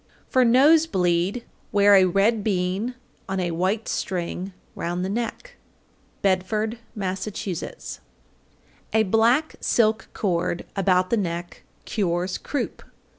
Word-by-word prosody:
For 255 - +3
nose 290 +7 +5
bleed 180 - 0 0.3
wear 205 -1 +5
a 190 -1 +7
red 200 +4 +2
bean 195 +4 -1 0.3
on 190 0 -1
a 175 -2 -1
white 190 +6 -1
string 180 +1 -3 0.2
round 175 +2 -3
the - - -2
neck. 240 - -4 0.7
Bedford, 210 +4 0 0.2
Mass. 190 -1 -3
803. 190 -4 -5 1.0
A - - +5
black 230 +9 +2
silk 220 -1 +2
cord 175 -3 -1
about 185 -1 +2
the 235 - +3
neck 175 -3 -4 0.2
cures 180 -3 -1
croup. 285 - -3
195 Hz, 120 wpm, -24 LUFS, 180-225 Hz, 1.0 s, a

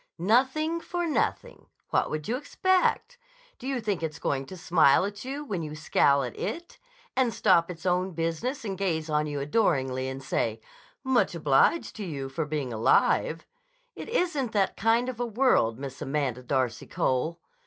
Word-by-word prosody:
"Nothing 265 - +2
for 350 0 -3
nothing. 315 - -2 0.2
What - - +2
would 155 -1 -4
you 235 - 0
expect? 375 - 0 0.4
Do 255 - -7
you 270 -2 -1
think 210 -6 -2
it's 160 -1 -3
going 135 -4 -2
to 185 - -9
smile 165 -2 +4
at 205 +1 -6
you 280 +3 -5
when 195 -10 -3
you 155 -1 -6
scowl 140 -2 +3
at 125 - -5
it, 340 0 -5 0.4
and 255 -3 +2
stop 185 -6 +3
its 170 -1 -8
own 180 +1 +1
business 165 - -2
and 195 -2 -3
gaze 165 -5 -2
on 150 0 +1
you 145 -1 -3
adoringly 135 - +1
and 135 +1 -7
say, 115 -4 -1 0.4
'Much 260 -8 +2
obliged 155 - +2
to 215 - -4
you 140 -7 -5
for 150 +4 -2
being 145 -5 -3
alive'? 110 0 +2 0.5
It - - -8
isn't 320 - 0
that 200 -3 +1
kind 230 +3 +2
of 255 -2 -5
a 245 - 0
world, 225 - +2
Miss 135 0 -7
Amanda 135 -3 -1
Darcy 125 -2 -1
Cole." 155 +7 -1
170 Hz, 175 wpm, -27 LUFS, -, 0.5 s, smile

